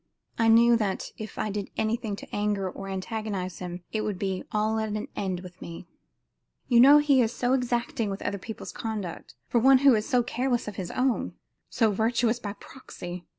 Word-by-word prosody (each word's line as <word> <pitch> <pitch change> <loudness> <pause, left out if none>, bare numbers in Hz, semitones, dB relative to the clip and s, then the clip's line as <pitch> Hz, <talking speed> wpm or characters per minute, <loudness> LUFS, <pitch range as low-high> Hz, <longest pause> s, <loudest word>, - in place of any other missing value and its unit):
I 225 - +4
knew 235 +1 +6
that 200 -4 -2
if 215 -1 -7
I 215 - -1
did 205 -1 -4
anything 220 -1 -1
to - - -9
anger 205 -2 0
or 195 +1 -7
to 195 - -4
antagonize 190 -2 -4
him, 180 -1 -6
it 215 - -1
would 210 -3 -2
be 190 -1 -2
all 215 +1 +1
at 220 0 -2
an 210 0 -3
end 185 -3 -2
with 180 -1 -12
me. 170 +1 -8 0.8
You 240 -2 +5
know 280 +4 +9
he 290 -3 +4
is 225 -2 +1
so 245 +1 0
exacting 240 -3 0
with 195 0 -5
other 200 - -2
people's 220 +3 -7
conduct, 210 -6 -5
for 240 - +2
one 265 +3 +7
who 275 - +9
is 215 +2 0
so 250 -3 +3
careless 245 0 -1
of 210 - -5
his 180 -3 -4
own 255 -1 0 0.3
so 225 -3 +2
virtuous 230 +3 +1
by 205 -3 -5
proxy. 180 -6 -9
215 Hz, 200 wpm, -27 LUFS, 195-235 Hz, 0.8 s, know